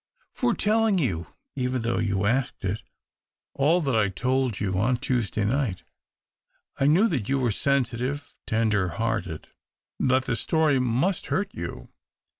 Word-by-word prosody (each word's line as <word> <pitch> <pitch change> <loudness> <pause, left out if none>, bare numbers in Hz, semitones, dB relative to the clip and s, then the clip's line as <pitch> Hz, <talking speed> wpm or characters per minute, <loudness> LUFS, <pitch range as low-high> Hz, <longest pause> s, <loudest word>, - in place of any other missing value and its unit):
For 245 -3 0
telling 215 -1 +2
you, 90 - -1 0.3
even 125 -2 -1
though 120 +1 0
you 100 -3 0
asked 125 0 0
it, 100 +3 -1 0.7
all 155 +6 +3
that 135 -6 0
I 105 -2 +3
told 130 +3 0
you 95 -2 -1
on 120 +4 +2
Tuesday 115 -4 -1
night. 120 -4 0 1.0
I 135 - +3
knew 180 +10 +5
that 135 - -2
you 135 - +2
were 125 -4 +1
sensitive, 135 +3 -1
tender 110 -4 +1
hearted 95 -4 -3 0.3
— - - -66
that 130 0 +2
the 120 - 0
story 155 +2 +2
must 130 +10 0
hurt 195 +1 -1
you. - - -6
125 Hz, 150 wpm, -26 LUFS, 110-145 Hz, 1.0 s, knew